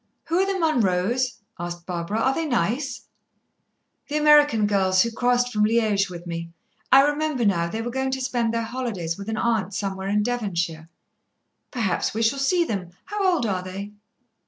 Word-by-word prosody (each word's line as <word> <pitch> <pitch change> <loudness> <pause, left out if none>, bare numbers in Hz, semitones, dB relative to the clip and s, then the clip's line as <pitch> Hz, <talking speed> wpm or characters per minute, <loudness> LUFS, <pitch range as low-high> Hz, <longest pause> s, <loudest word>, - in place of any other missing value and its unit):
"Who 335 +2 +2
are 385 - +2
the 390 - -1
Munroes?" 245 - +1 0.2
asked 175 0 -6
Barbara. 180 +4 -3
"Are 265 - +2
they 325 +2 -2
nice?" 255 +1 -1 1.0
"The 295 - -1
American 295 -7 +5
girls 190 -2 +3
who 235 - -2
crossed 245 +1 +1
from 210 0 +2
Liège 215 -3 +2
with 175 -1 -9
me. 170 -1 -5 0.4
I 270 - +9
remember 295 -3 0
now, 170 -4 +2
they 225 +5 -3
were 240 - -3
going 265 +1 -1
to 265 0 -2
spend 245 -3 0
their 230 0 -1
holidays 225 -9 -3
with 200 +3 -7
an 220 - -2
aunt 220 -4 0
somewhere 195 -1 -3
in 210 +1 +1
Devonshire." 175 -9 -2 0.8
"Perhaps 220 -5 -1
we 225 - 0
shall 235 +5 +2
see 345 +6 +2
them. 195 - -3 0.2
How 405 -3 +1
old 315 -9 0
are 190 -4 -1
they?" 195 +3 -7
225 Hz, 180 wpm, -24 LUFS, 190-260 Hz, 1.0 s, I